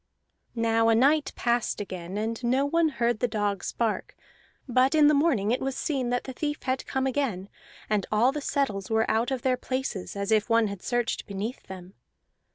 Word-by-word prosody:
Now 225 Hz, 0 st, +2 dB
a 225 Hz, -, +5 dB
night 285 Hz, +6 st, +3 dB
passed 240 Hz, -1 st, 0 dB
again, 185 Hz, -2 st, -6 dB
and 225 Hz, +3 st, -3 dB
no 260 Hz, +4 st, +2 dB
one 330 Hz, +2 st, +2 dB
heard 235 Hz, -5 st, 0 dB
the 245 Hz, -, +1 dB
dogs 205 Hz, -4 st, -2 dB
bark; 225 Hz, -3 st, -2 dB, 0.5 s
but 255 Hz, +3 st, +3 dB
in 305 Hz, -1 st, +6 dB
the 300 Hz, -, +6 dB
morning 280 Hz, -9 st, +2 dB
it 250 Hz, -, 0 dB
was 270 Hz, 0 st, -2 dB
seen 265 Hz, -5 st, -1 dB
that 245 Hz, 0 st, 0 dB
the 260 Hz, -, -7 dB
thief 295 Hz, +2 st, -3 dB
had 260 Hz, 0 st, -2 dB
come 265 Hz, 0 st, -1 dB
again, 245 Hz, -8 st, -1 dB, 0.4 s
and 210 Hz, -3 st, 0 dB
all 225 Hz, +5 st, +4 dB
the 295 Hz, +1 st, -4 dB
settles 270 Hz, -10 st, -1 dB
were 220 Hz, 0 st, +2 dB
out 230 Hz, +3 st, +1 dB
of 265 Hz, -3 st, -3 dB
their 255 Hz, -1 st, +2 dB
places, 255 Hz, -8 st, -4 dB
as 200 Hz, +1 st, -2 dB
if 215 Hz, +1 st, +2 dB
one 230 Hz, -2 st, +3 dB
had 200 Hz, -2 st, -7 dB
searched 240 Hz, -1 st, -1 dB
beneath 205 Hz, +5 st, -4 dB
them. 185 Hz, 0 st, -10 dB
235 Hz, 195 wpm, -27 LUFS, 210-265 Hz, 0.5 s, in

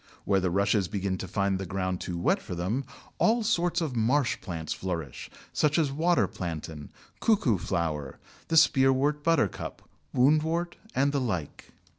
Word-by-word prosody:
Where 95 Hz, -, +3 dB
the 95 Hz, -1 st, 0 dB
Rushes 100 Hz, +1 st, +2 dB
begin 95 Hz, -2 st, -2 dB
to 95 Hz, -, -5 dB
find 100 Hz, 0 st, 0 dB
the 95 Hz, -, -4 dB
ground 95 Hz, 0 st, -2 dB
too 90 Hz, -, -4 dB
wet 85 Hz, -, +1 dB
for 90 Hz, -, -6 dB
them, 105 Hz, +11 st, -2 dB, 0.3 s
all 230 Hz, +1 st, +3 dB
sorts 175 Hz, -5 st, +1 dB
of 150 Hz, -6 st, -2 dB
marsh 120 Hz, +4 st, +1 dB
plants 80 Hz, -5 st, -4 dB
flourish, 85 Hz, -8 st, -5 dB, 0.2 s
such 150 Hz, +1 st, +2 dB
as 155 Hz, -4 st, +2 dB
Water 165 Hz, +5 st, +2 dB
Plantain, 80 Hz, -4 st, -6 dB, 0.3 s
Cuckoo 140 Hz, -, +2 dB
flower, 80 Hz, -7 st, -2 dB, 0.3 s
the 165 Hz, -, +2 dB
Spearwort 140 Hz, 0 st, +4 dB
Buttercup, 165 Hz, -, 0 dB, 0.3 s
Woundwort, 160 Hz, +6 st, +2 dB, 0.2 s
and 140 Hz, +2 st, +3 dB
the 140 Hz, -1 st, 0 dB
like. 90 Hz, -, -4 dB
110 Hz, 155 wpm, -28 LUFS, 90-150 Hz, 0.3 s, Spearwort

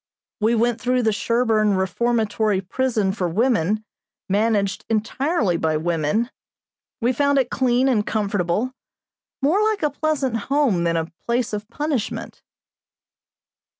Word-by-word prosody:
We 225 Hz, +2 st, +2 dB
went 235 Hz, 0 st, +1 dB
through 250 Hz, 0 st, +1 dB
the 220 Hz, -, +3 dB
Sherborn 220 Hz, -2 st, +2 dB
Reformatory 215 Hz, +1 st, 0 dB
Prison 215 Hz, 0 st, 0 dB
for 190 Hz, -3 st, -2 dB
Women, 215 Hz, 0 st, +1 dB, 0.4 s
managed 205 Hz, -1 st, +1 dB
entirely 225 Hz, -, 0 dB
by 160 Hz, -1 st, 0 dB
women. 170 Hz, -, 0 dB, 0.7 s
We 240 Hz, +3 st, +2 dB
found 285 Hz, +1 st, +2 dB
it 260 Hz, -2 st, +1 dB
clean 255 Hz, 0 st, +2 dB
and 230 Hz, -6 st, +2 dB
comfortable, 205 Hz, +2 st, -1 dB, 0.7 s
more 335 Hz, +9 st, +3 dB
like 430 Hz, -3 st, +1 dB
a 300 Hz, -, +2 dB
pleasant 285 Hz, -4 st, -1 dB
home 270 Hz, -12 st, +2 dB
than 165 Hz, 0 st, +1 dB
a 165 Hz, 0 st, -3 dB, 0.2 s
place 235 Hz, -1 st, 0 dB
of 210 Hz, 0 st, -4 dB
punishment. 285 Hz, -3 st, -3 dB
225 Hz, 125 wpm, -22 LUFS, 200-255 Hz, 0.7 s, the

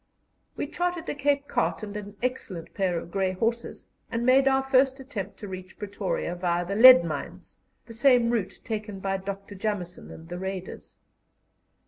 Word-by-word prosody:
We -, -, -1 dB
chartered 355 Hz, -1 st, -2 dB
a -, -, -1 dB
Cape 285 Hz, 0 st, 0 dB
cart -, -, -1 dB
and 205 Hz, -1 st, -6 dB
an 205 Hz, 0 st, -7 dB
excellent 215 Hz, -9 st, -4 dB
pair 185 Hz, -3 st, 0 dB
of 170 Hz, -, -7 dB
grey 190 Hz, -1 st, 0 dB
horses, 230 Hz, +5 st, -2 dB, 0.2 s
and 230 Hz, +1 st, -2 dB
made 265 Hz, +2 st, +5 dB
our 265 Hz, 0 st, +3 dB
first 265 Hz, 0 st, +3 dB
attempt 215 Hz, -7 st, -6 dB
to 205 Hz, -, -8 dB
reach 185 Hz, -1 st, -9 dB
Pretoria 200 Hz, -3 st, -3 dB
via 175 Hz, 0 st, -1 dB
the 195 Hz, -, -3 dB
lead 225 Hz, -4 st, +9 dB
mines, 165 Hz, -, -6 dB, 0.3 s
the 230 Hz, -, -11 dB
same 240 Hz, -1 st, +4 dB
route 220 Hz, -6 st, -2 dB
taken 210 Hz, -3 st, -4 dB
by 195 Hz, 0 st, -1 dB
Dr. 195 Hz, +1 st, -7 dB
Jameson 185 Hz, -3 st, -4 dB
and 160 Hz, -, -11 dB
the 175 Hz, +1 st, -6 dB
Raiders. 190 Hz, -1 st, -6 dB
205 Hz, 170 wpm, -27 LUFS, 185-255 Hz, 0.3 s, lead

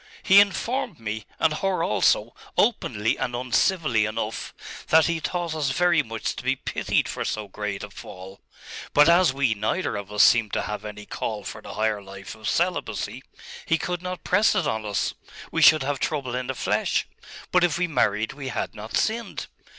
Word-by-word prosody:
He 195 Hz, 0 st, +7 dB
informed 205 Hz, -, +1 dB
me, 110 Hz, -1 st, -5 dB
and 160 Hz, -1 st, +2 dB
her 190 Hz, +3 st, 0 dB
also, -, -, +2 dB, 0.2 s
openly 115 Hz, -, +1 dB
and 125 Hz, -, -2 dB
uncivilly 125 Hz, -, +1 dB
enough, 110 Hz, 0 st, -4 dB, 0.4 s
that 160 Hz, 0 st, +5 dB
he 170 Hz, -1 st, 0 dB
thought 175 Hz, 0 st, -2 dB
us 150 Hz, -3 st, -1 dB
very 170 Hz, +3 st, +3 dB
much 115 Hz, -5 st, -4 dB
to -, -, -6 dB
be -, -, +1 dB
pitied -, -, -1 dB
for -, -, -3 dB
so 105 Hz, -1 st, -3 dB
great 100 Hz, 0 st, -4 dB
a 105 Hz, -, -7 dB
fall.... 95 Hz, -1 st, -11 dB, 0.5 s
But 150 Hz, +1 st, +7 dB
as 170 Hz, -2 st, +5 dB
we 135 Hz, -4 st, +1 dB
neither 110 Hz, -, -1 dB
of 100 Hz, 0 st, -6 dB
us 105 Hz, -, +5 dB
seemed 115 Hz, -4 st, +4 dB
to -, -, 0 dB
have 105 Hz, 0 st, -5 dB
any 105 Hz, 0 st, -8 dB
call 105 Hz, -1 st, -4 dB
for -, -, -7 dB
the -, -, -9 dB
higher 110 Hz, -1 st, 0 dB
life 95 Hz, 0 st, -9 dB
of 110 Hz, -1 st, -4 dB
celibacy, 140 Hz, -, -1 dB, 0.5 s
he 165 Hz, -, +3 dB
could 175 Hz, +1 st, -3 dB
not 180 Hz, 0 st, -5 dB
press 205 Hz, +4 st, +3 dB
it 185 Hz, -6 st, +1 dB
on 110 Hz, -5 st, -2 dB
us.... 100 Hz, -, -1 dB, 0.4 s
We -, -, 0 dB
should 155 Hz, -3 st, +7 dB
have 140 Hz, 0 st, -2 dB
trouble 135 Hz, -5 st, -2 dB
in 125 Hz, 0 st, -3 dB
the 130 Hz, -, -3 dB
flesh. -, -, 0 dB, 0.5 s
But 180 Hz, -1 st, +4 dB
if 175 Hz, -2 st, +2 dB
we 180 Hz, -, +1 dB
married 110 Hz, -, 0 dB
we 140 Hz, -1 st, -7 dB
had 130 Hz, -, -3 dB
not 105 Hz, +2 st, -4 dB
sinned. 230 Hz, +1 st, -1 dB
130 Hz, 190 wpm, -25 LUFS, 105-175 Hz, 0.5 s, He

